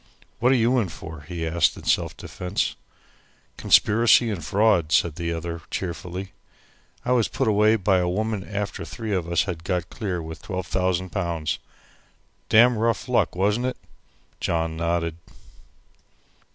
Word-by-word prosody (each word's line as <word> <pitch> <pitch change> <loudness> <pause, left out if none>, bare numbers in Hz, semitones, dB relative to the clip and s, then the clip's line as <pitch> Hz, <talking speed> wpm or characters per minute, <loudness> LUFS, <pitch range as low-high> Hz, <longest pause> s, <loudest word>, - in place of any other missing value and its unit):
"What 125 +3 +4
are - - +5
you 125 +1 +3
in 100 -6 -1
for?" 80 -1 -9
he 85 -2 -4
asked 80 +1 +2
in - - -10
self - - 0
defence. 90 +2 -3 0.8
"Conspiracy 115 +2 +4
and 90 -6 -4
fraud," 95 -4 +2
said 80 0 +3
the 85 +1 -3
other 85 0 -4
cheerfully. 90 +1 -5 0.7
"I 125 - 0
was 120 -3 +3
put - - -1
away 105 +1 +4
by 95 -3 +2
a 90 -1 0
woman 105 +1 -1
after 100 -3 -4
three 90 +7 -5
of 85 -3 -2
us 85 - +3
had 85 -4 -5
got 90 -2 -2
clear 95 -5 -3
with 80 0 -8
12,000 95 -1 -2
pounds. 85 -5 -2 0.9
Damn 115 +1 +6
rough 115 +2 0
luck, 125 -6 +1
wasn't 105 +7 +1
it?" 130 - -3 0.6
John 80 -1 -1
nodded. 85 0 -1
95 Hz, 150 wpm, -24 LUFS, 85-110 Hz, 0.9 s, Damn